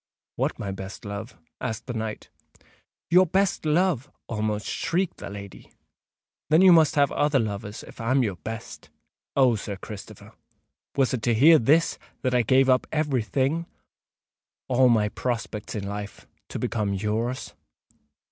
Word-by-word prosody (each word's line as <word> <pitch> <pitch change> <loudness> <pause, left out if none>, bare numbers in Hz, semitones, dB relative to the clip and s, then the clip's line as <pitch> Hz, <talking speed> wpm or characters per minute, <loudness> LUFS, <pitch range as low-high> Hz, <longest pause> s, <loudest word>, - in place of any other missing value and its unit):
"What, - - -1
my 100 - -4
best 95 +2 -8
love?" 100 -1 -6 0.2
asked 110 - -4
the 125 - -5
knight. 110 -2 -5 0.8
"Your 180 +1 +6
best 190 -2 +1
love!" 155 -4 +1 0.2
almost 105 -1 -2
shrieked 180 +1 -1
the - - -7
lady. 100 -1 -10 0.8
"Then 160 +4 +5
you 190 - +8
must 160 -1 +5
have 140 -2 +3
other 145 -1 +2
loves, 105 -2 -3
if - - -11
I'm 130 +3 +2
your 100 -6 -2
best! 110 +6 -8 0.5
Oh! 130 -3 +5
Sir 105 -2 -4
Christopher, 100 +1 -10 0.6
was 135 -2 +2
it 125 - -1
to 120 +1 +2
hear 155 +7 +7
this 155 +8 +3 0.2
that 130 -1 +1
I 125 - +4
gave 130 +3 +4
up 130 -1 +3
every 150 -5 +1
thing—all 130 -1 -2
my 110 -3 +3
prospects 115 -3 -4
in 100 -2 -3
life—to 100 0 -8
become 105 -3 -1
yours?" 110 +5 -2
120 Hz, 145 wpm, -25 LUFS, 105-145 Hz, 0.8 s, you